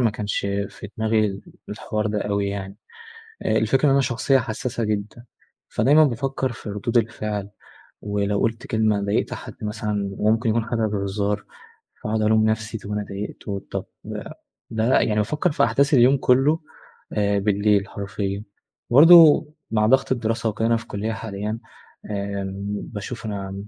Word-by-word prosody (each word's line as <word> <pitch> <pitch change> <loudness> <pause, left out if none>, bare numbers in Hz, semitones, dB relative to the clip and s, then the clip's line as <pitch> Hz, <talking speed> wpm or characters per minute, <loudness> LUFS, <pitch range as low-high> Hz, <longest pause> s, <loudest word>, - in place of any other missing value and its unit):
ما 115 -3 +3
كانش 105 -1 -2 0.3
في 105 - -10
دماغي 110 -1 +2
ال 100 -1 -5 0.3
الحوار 105 0 -3
ده 105 -1 -1
أوي 100 -1 -1
يعني. 100 0 -5 0.7
آآ 110 - +2
الفكرة 130 +6 +2
إن 140 - +5
أنا 140 - +4
شخصية 130 +1 +2
حساسة 120 0 -3
جدًا، 105 +3 -3 0.4
فدايمًا 145 +8 +4
بافكَر 130 0 -1
في 110 - -9
ردود 110 +4 -2
الفعل، 105 -3 -3 0.5
ولو 100 0 -1
قُلت 115 +1 -1
كلمة، 110 -2 +1
ضايقت 100 +1 -1
حد - - -9
مثلًا 105 -2 -3
ممكن 110 +2 +2
يكون 115 +1 +1
حاجة 115 -1 0
بهزار 100 0 -2 0.6
فأقعد 110 0 -1
ألوم 110 0 +3
نفسي 110 0 -1
طب 100 0 -10
أنا 105 0 -2
ضايقته، 100 0 -6
طب - - -3 0.9
ده 115 +3 +2
يعني 105 - +1
بافكَر 150 - 0
في 165 - +3
أحداث 140 +2 +2
اليوم 130 +2 +6
كلّه 135 +5 +3 0.5
آآ 100 -1 +1
بالليل 100 0 +2
حرفيًا. 100 0 -4 0.5
برضه 160 +3 +8 0.2
مع 110 -1 +2
ضغط 130 +3 +3
الدراسة 115 -1 -1
وكده 110 +2 -1
أنا 115 0 +3
في 115 - -7
كُلية 105 +2 -3
حاليًا، 105 0 -4 0.5
آمم، 100 -1 -3 0.4
باشوف 110 +2 -6
أنا 95 -2 -4
110 Hz, 150 wpm, -23 LUFS, 100-115 Hz, 0.9 s, برضه